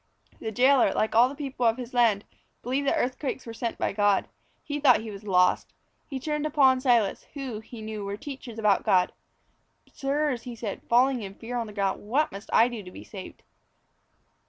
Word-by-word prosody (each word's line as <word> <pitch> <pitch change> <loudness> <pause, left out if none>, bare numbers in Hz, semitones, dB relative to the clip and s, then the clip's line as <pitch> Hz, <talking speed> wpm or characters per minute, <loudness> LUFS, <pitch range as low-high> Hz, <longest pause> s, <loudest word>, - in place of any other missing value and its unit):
The 220 - -4
jailor, 255 +3 +4
like 220 - 0
all 240 +3 +6
the 280 - -8
people 270 -4 -1
of 225 +1 +2
his 250 -1 -7
land, 225 -4 +3 0.4
believed 270 +3 -1
that - - +3
earthquakes 260 +1 -2
were 230 - -7
sent 230 0 -3
by - - -1
God. 205 -1 +2 0.4
He 290 0 -3
thought 270 -6 +5
he 220 -1 -7
was 200 +1 -10
lost. 180 -2 +2 0.3
He 270 -3 -5
turned 300 +2 -2
to - - 0
Paul 280 -3 +5
and 260 0 -1
Silas 235 -6 +2
who, 260 -6 -5
he 220 0 -10
knew, 215 -1 -5
were 200 0 -4
teachers 265 -4 -8
about 210 -3 +2
God. 180 -1 +3 0.8
"Sirs," 280 -2 -1
he 245 0 -8
said, 215 -3 -5
falling 250 +1 +4
in 195 -1 -7
fear 235 +3 -7
on 235 -2 -2
the 210 - -10
ground, 200 -2 -1
"what 270 +9 0
must 200 +2 -9
I 230 - +6
do 240 -3 -6
to 185 - -10
be - - -11
saved?" 190 -3 -10
235 Hz, 205 wpm, -27 LUFS, 210-265 Hz, 0.8 s, all